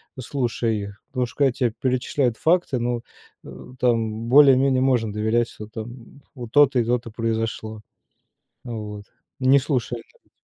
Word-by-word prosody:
ну, 130 - -7
слушая 120 -2 -1
их. 100 -1 -6
Потому 125 -2 -1
что - - -15
когда 140 -2 +3
те 120 -2 0
перечисляют 130 -1 0
факты, 165 -6 +1
ну, 120 0 -1 0.4
э, - - -11
там 115 -2 0
более-менее 135 -1 +6
можно 120 -5 +1
доверять, 110 +2 +1
что 105 - -10
там 115 +5 -10
вот 120 -3 -8
то-то 140 -2 +5
и 115 - +1
то-то 120 -1 -1
произошло. 110 -1 -3 0.8
Вот. 105 -4 -6 0.4
Не 135 +2 +5
слушай 125 -3 -2
это - - -25
120 Hz, 150 wpm, -23 LUFS, 110-130 Hz, 0.8 s, более-менее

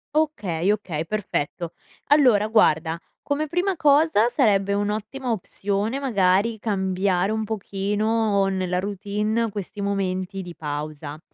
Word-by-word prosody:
Okay, 205 - +1
okay, 175 -7 -2
perfetto. 170 -4 -3 0.3
Allora, 250 -8 +5
guarda, 160 -7 +3 0.2
come 300 +2 -1
prima 360 +5 0
cosa 290 -6 +4
sarebbe 205 -6 +2
un'ottima 215 +6 -2
opzione, 205 +3 -2
magari, 210 -3 +2
cambiare 190 -2 0
un 220 0 -1
pochino 210 0 0
nella 185 -2 -1
routine 210 +3 -1
questi 205 0 -6
momenti 195 -1 -2
di 175 -2 -9
pausa. 150 0 -5
205 Hz, 110 wpm, -24 LUFS, 185-225 Hz, 0.3 s, Allora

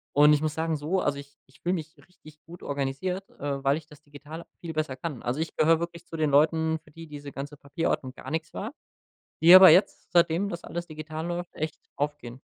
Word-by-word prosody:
und 150 +1 +7
ich 150 - +2
muss 155 -1 -1
sagen 160 0 -1
so 155 +6 -1
also 140 - -1
ich 140 0 -13
ich 130 - -23
fühle 180 +2 0
mich 160 -1 -7
richtig 155 -4 -18
gut 175 +2 -12
organisiert, 145 +8 -3
äh, 140 -1 -3
weil 140 +1 +3
ich 160 - -10
das 150 -2 -16
digital 150 +3 -10 0.2
viel 165 -2 -6
besser 155 -4 -2
kann. 140 -2 -6
Also, 125 +5 -2
ich 160 - -3
gehöre 160 +1 +4
wirklich 170 0 -6
zu 165 - -7
den 155 -2 +1
Leuten, 160 +2 +3
für - - -20
die 165 +2 -10
diese 145 -1 -9
ganze 140 +2 -7
Papierordnung 140 -2 -2
gar 130 +1 -9
nix 160 0 -3
war, 225 +8 -5 0.7
die 170 +3 +9
aber 185 0 +11
jetzt, 185 +5 +2
seitdem 170 +3 +3
das 170 -3 -6
alles 170 0 -5
digital 155 +1 -6
läuft, 175 0 -4
echt 155 0 -4
aufgehen. 140 -4 -4
155 Hz, 220 wpm, -27 LUFS, 145-170 Hz, 0.7 s, aber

